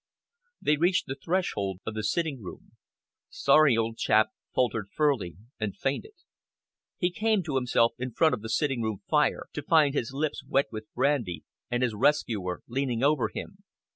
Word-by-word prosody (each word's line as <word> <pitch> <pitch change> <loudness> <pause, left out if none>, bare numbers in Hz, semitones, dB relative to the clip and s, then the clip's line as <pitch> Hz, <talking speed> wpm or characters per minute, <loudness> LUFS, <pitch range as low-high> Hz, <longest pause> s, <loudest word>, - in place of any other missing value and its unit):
They 150 - +2
reached 175 +4 +2
the 135 - -4
threshold 135 - -2
of 110 - -3
the 110 - -3
sitting 140 +4 -1
room. 90 - -10 0.6
"Sorry, 155 -6 +4
old 115 0 -1
chap," 110 0 +3 0.2
faltered 115 -5 0
Furley 135 - 0 0.2
and 105 -3 -3
fainted. 140 - -3 0.8
He 180 0 +1
came 215 +1 +1
to 155 -4 -4
himself 125 -3 +2
in 130 0 -3
front 160 +7 +3
of - - -2
the 110 - -6
sitting 135 0 0
room 110 -3 -3
fire, 150 -1 +2
to 150 - -4
find 150 -1 +4
his 120 -5 -1
lips 145 +3 -2
wet 135 +1 +2
with 110 -1 -8
brandy 125 - 0 0.3
and 120 +1 0
his 120 -3 +1
rescuer 105 -7 0
leaning 125 -1 -1
over 140 -6 +3
him. 190 - -8
130 Hz, 170 wpm, -28 LUFS, 110-150 Hz, 0.8 s, Sorry